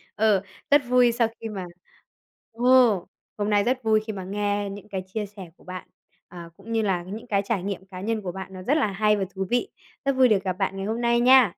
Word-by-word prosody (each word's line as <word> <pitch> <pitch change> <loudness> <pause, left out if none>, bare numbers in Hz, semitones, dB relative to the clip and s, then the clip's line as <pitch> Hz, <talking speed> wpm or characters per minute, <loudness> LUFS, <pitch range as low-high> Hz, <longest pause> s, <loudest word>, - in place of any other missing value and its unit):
Ờ, 210 -3 +3 0.3
rất 290 0 +7
vui 250 -1 +5
sau 230 -1 +2
khi 225 - -4
mà 190 -3 -5 0.9
ồ. 240 -5 +4 0.3
Hôm 205 0 -1
nay 205 -1 +3
rất 255 +2 0
vui 220 -1 +4
khi 215 - -3
mà 190 -2 -6
nghe 205 +1 -1
những 205 +1 -9
cái 190 -2 -4
chia 210 +2 -3
sẻ 195 -4 -11
của - - -21
bạn, 185 0 -8 0.4
à, 170 -1 -10
cũng 215 +4 -11
như 225 -1 +2
là 185 -4 0
những 215 +6 -8
cái 200 -3 +1
trải 200 -5 -1
nghiệm 195 -1 -4
cá 185 -1 -9
nhân 220 +1 -1
của 180 -2 -4
bạn 190 +1 -8
nó 185 - -8
rất 290 +8 +2
là 275 - +2
hay 210 +1 +2
và 195 - -1
thú 190 0 -2
vị. 245 +11 +1 0.4
Rất 275 - +3
vui 260 -1 +6
được 205 -3 +2
gặp 185 -1 -1
bạn 195 +1 -2
ngày 195 - -3
hôm 225 +3 -2
nay 235 0 +3
nha. 250 -5 +6
205 Hz, 250 wpm, -25 LUFS, 190-230 Hz, 0.9 s, rất